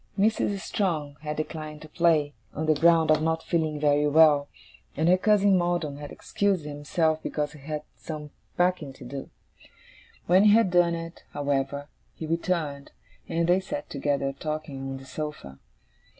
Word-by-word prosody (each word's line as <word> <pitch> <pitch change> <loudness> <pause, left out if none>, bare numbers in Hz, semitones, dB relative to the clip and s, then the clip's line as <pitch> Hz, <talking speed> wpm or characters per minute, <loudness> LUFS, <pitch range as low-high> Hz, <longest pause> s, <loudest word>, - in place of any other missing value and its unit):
Mrs. 205 -1 +1
Strong 155 -9 -2
had 150 0 -4
declined 155 -1 -5
to - - -10
play, 155 -3 +2 0.2
on 155 - -2
the 155 - +4
ground 165 +1 +4
of 155 0 +4
not 160 0 0
feeling 155 -3 -1
very 145 0 +3
well; 150 -1 +5 0.5
and 160 +2 +2
her 180 - +6
cousin 205 0 +4
Maldon 175 -5 -1
had 145 0 -8
excused 195 -6 -1
himself 155 +2 0
because 150 0 -3
he 150 - -13
had 150 +2 -5
some 150 -2 -7 0.3
packing 175 -6 +1
to 130 - -12
do. 135 +2 -7 1.0
When 185 +4 +5
he 205 - +7
had 225 -4 +4
done 175 -1 +4
it, 165 +1 -7
however, 140 0 -1 0.3
he 160 - -6
returned, 160 -4 -2 0.4
and 170 0 0
they 180 +2 +4
sat 290 +10 -6
together, 140 -1 -1
talking, 155 -2 -5
on 135 - -4
the 135 - -12
sofa. 130 - -6
155 Hz, 165 wpm, -26 LUFS, 145-170 Hz, 1.0 s, he